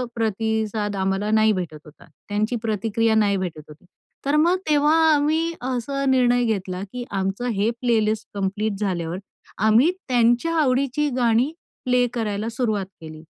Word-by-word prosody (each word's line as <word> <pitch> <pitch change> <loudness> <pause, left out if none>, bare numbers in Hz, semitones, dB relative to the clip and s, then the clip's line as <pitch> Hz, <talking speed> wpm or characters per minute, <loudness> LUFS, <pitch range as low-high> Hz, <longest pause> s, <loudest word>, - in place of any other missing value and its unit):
प्रतिसाद 220 -1 -1
आम्हाला 195 +2 -1
नाही 220 0 +4
भेटत 175 -5 -4
होता. 150 - -16 0.2
त्यांची 215 +4 0
प्रतिक्रिया 225 0 0
नाही 205 -2 +3
भेटत 175 -5 -4
होती. 150 +4 -15 0.4
तर 280 +2 +1
मग 340 +4 +3
तेव्हा 295 +1 +4 0.2
आम्ही 310 +3 +1
असा 260 +2 -2
निर्णय 245 -2 +3
घेतला, 190 -4 -2
की 250 - -4
आमचं 195 +5 -2
हे 205 +3 +2
प्लेलिस्ट 220 -3 +1
कंप्लीट 205 +2 -1
झाल्यावर 175 -4 -2 0.5
आम्ही 235 +10 +5 0.2
त्यांच्या 245 +5 +2
आवडीची 275 +2 +1
गाणी 240 +3 +2 0.3
प्ले 250 0 +3
करायला 215 -1 -2
सुरुवात 220 -5 -1 0.2
केली. 155 0 -10
220 Hz, 140 wpm, -23 LUFS, 200-250 Hz, 0.5 s, आम्ही